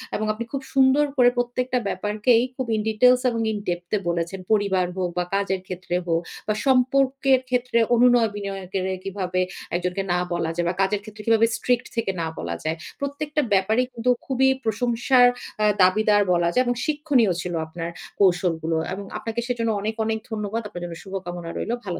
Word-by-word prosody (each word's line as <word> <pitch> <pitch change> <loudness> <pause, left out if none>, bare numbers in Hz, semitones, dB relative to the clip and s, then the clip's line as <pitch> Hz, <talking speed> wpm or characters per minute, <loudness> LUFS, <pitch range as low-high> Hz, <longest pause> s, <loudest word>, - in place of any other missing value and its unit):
এবং 215 - -1
আপনি 225 +2 -5
খুব 275 - -3
সুন্দর 270 +2 +5
করে 245 -1 +6
প্রত্যেকটা 250 +1 0
ব্যাপারকেই 210 +5 +2
খুব 260 -1 -3
ইন 215 - 0
ডিটেইলস 250 +3 +5
এবং 230 -1 -2
ইন 215 - -2
ডেপথ 175 0 -4
এ - - -3
বলেছেন। 170 +2 -2
পরিবার 200 -4 +2
হোক 180 -1 0
বা 180 - +1
কাজের 195 -1 0
ক্ষেত্রে 180 -1 -4
হোক 165 0 +1 0.3
বা 215 - +2
সম্পর্কের 265 +1 +3
ক্ষেত্রে 250 -1 0 0.2
অনুনয় 240 -1 +5
বিনয়কে 195 -2 -4 0.3
কিভাবে 185 -2 -2 0.3
একজনকে 180 +2 -1
না 180 - +1
বলা 170 -2 -1
যায় 175 0 0
বা 175 - -2
কাজের 200 +1 +1
ক্ষেত্রে 215 0 -11
কিভাবে 225 0 +5
স্ট্রিক্ট 245 -1 0
থেকে 230 -4 0
না 165 - -1
বলা 85 0 -3
যায়। 160 +1 -1 0.2
প্রত্যেকটা 290 +2 -2
ব্যাপারেই 220 +6 +2
কিন্তু 235 +1 -1 0.2
খুবই 265 0 +2 0.2
প্রশংসার 240 +3 +3 0.3
এ্যাঁ 210 -1 +3
দাবিদার 205 +2 +4
বলা 170 -1 +2
যায় 255 - +3
এবং 245 - 0
শিক্ষণীয় 290 - +2
ছিল 180 -1 -4
আপনার 165 0 -5 0.3
কৌশলগুলো। 175 -4 +2 0.2
এবং 200 +1 -6
আপনাকে 225 +1 -3
সেজন্য 235 -2 -1
অনেক, 220 +2 -2
অনেক 220 0 -1
ধন্যবাদ। 215 +1 -2
আপনার 180 -4 -8
জন্য 170 -1 -7
শুভকামনা 175 -3 -6
রইলো। 235 - -2
ভালো 180 -3 -4
215 Hz, 175 wpm, -23 LUFS, 185-245 Hz, 0.3 s, করে